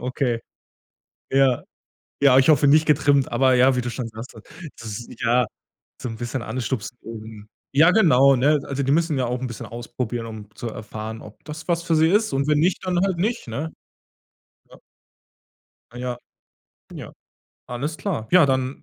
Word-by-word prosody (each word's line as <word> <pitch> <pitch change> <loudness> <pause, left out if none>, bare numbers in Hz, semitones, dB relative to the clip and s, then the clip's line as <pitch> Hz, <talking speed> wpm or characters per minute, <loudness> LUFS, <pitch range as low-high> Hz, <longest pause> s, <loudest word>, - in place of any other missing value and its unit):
Okay. 125 -1 -1 0.9
Ja. 135 -2 +3 0.6
Ja, 135 -2 +6
ich 135 - +4
hoffe 145 -2 +5
nicht 155 +2 +5
getrimmt. 140 -2 +3
Aber 130 -1 +3
ja, 130 +1 +4
wie - - +1
du 120 0 -4
schon 115 0 -5
sagtest. 110 0 -11 0.3
Das 115 - -8
ist 120 +3 -8
ja 120 0 +3 0.6
so 125 - -3
'n 115 - -6
bisschen 120 +1 -4
anstupsen, 125 -1 -4
um 110 -2 -10 0.3
ja, 160 +5 +6
genau, 140 - +5
ne? 145 +4 +3
Also, 140 0 -3
die 135 +1 +1
müssen 160 -3 +1
ja 125 - 0
auch 125 +1 -2
'n 130 - -3
bisschen 120 -3 -7
ausprobieren, 120 0 -5
um 105 -2 -10
zu 120 - -5
erfahren, 110 +1 -7
ob 105 - -14
das 155 +2 -9
was 170 0 +1
für 170 -2 0
sie 160 +1 +4
ist 210 -3 +2
und 135 +1 0
wenn 150 -1 +3
nicht, 180 +2 +1
dann 180 -1 0
halt 185 -3 -1
nicht, 225 - -1
ne? 145 +8 -4 1.0
Ja. - - -15 1.1
Ah, - - -13
ja. 125 -1 -4 0.8
Ja. - - -8 0.6
Alles 140 +6 -4
klar. 145 - -4
Ja, 180 -5 +6
dann 130 0 -1
130 Hz, 180 wpm, -23 LUFS, 120-150 Hz, 1.1 s, Ja